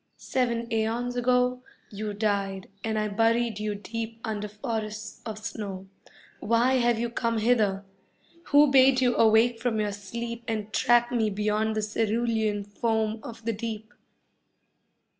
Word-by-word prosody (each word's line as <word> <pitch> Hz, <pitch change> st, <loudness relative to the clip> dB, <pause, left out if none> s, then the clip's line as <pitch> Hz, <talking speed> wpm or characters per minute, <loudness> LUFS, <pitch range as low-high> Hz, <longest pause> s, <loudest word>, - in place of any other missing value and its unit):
Seven 235 Hz, -2 st, -1 dB
aeons 230 Hz, +3 st, -1 dB
ago 250 Hz, 0 st, +2 dB, 0.3 s
You 210 Hz, 0 st, -4 dB
died 200 Hz, -2 st, -1 dB, 0.2 s
and 220 Hz, -1 st, -1 dB
I 215 Hz, 0 st, 0 dB
buried 225 Hz, +1 st, +1 dB
you 210 Hz, -1 st, -2 dB
deep 225 Hz, +2 st, -6 dB
under 210 Hz, -2 st, -3 dB
forests 215 Hz, -1 st, -5 dB
of 215 Hz, -1 st, -5 dB
snow. 200 Hz, -3 st, -6 dB, 0.5 s
Why 235 Hz, +4 st, +2 dB
have 240 Hz, -1 st, +2 dB
you 235 Hz, +1 st, -1 dB
come 230 Hz, -1 st, -1 dB
hither? 215 Hz, -4 st, +2 dB, 0.6 s
Who 290 Hz, -1 st, +5 dB
bade 265 Hz, -1 st, +6 dB
you 245 Hz, -2 st, +2 dB
awake 225 Hz, +1 st, +4 dB
from 230 Hz, -2 st, 0 dB
your 210 Hz, -1 st, 0 dB
sleep 230 Hz, +4 st, -6 dB
And 215 Hz, -2 st, -3 dB
track 240 Hz, 0 st, +3 dB
me 225 Hz, -3 st, +1 dB
beyond 210 Hz, +2 st, 0 dB
the 215 Hz, -, -1 dB
cerulean 220 Hz, -1 st, 0 dB
foam 220 Hz, +1 st, -1 dB
of 230 Hz, -1 st, -10 dB
the 230 Hz, -, 0 dB
deep? 220 Hz, +1 st, -6 dB
220 Hz, 140 wpm, -27 LUFS, 210-235 Hz, 0.6 s, bade